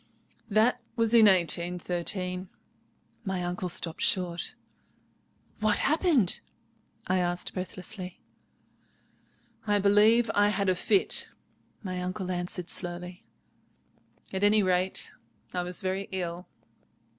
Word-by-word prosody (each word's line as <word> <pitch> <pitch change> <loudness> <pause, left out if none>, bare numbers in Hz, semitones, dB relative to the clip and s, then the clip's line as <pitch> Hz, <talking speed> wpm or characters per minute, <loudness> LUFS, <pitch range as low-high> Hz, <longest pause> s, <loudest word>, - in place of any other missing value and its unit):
"That 220 +4 +3
was 230 -1 +2
in 225 -2 +8
1813." 180 +1 +1 0.7
My 190 -4 -2
uncle 180 +1 -3
stopped 165 -1 0
short. 175 -2 0 1.0
"What 215 -1 +2
happened?" 300 - +2 0.7
I 185 0 +1
asked 175 0 -1
breathlessly. 185 0 -6 1.5
"I 205 0 +3
believe 210 +3 +4
I 205 0 +4
had 200 -1 0
a 185 - +2
fit," 390 - +2 0.5
my 185 -2 -4
uncle 185 +1 -4
answered 175 -1 -2
slowly; 180 0 -4 1.1
"at 190 +1 -2
any 210 0 +5
rate, 185 0 0 0.4
I 180 - 0
was 180 0 -3
very 190 +1 -2
ill." 180 -1 -4
185 Hz, 105 wpm, -28 LUFS, 180-205 Hz, 1.5 s, in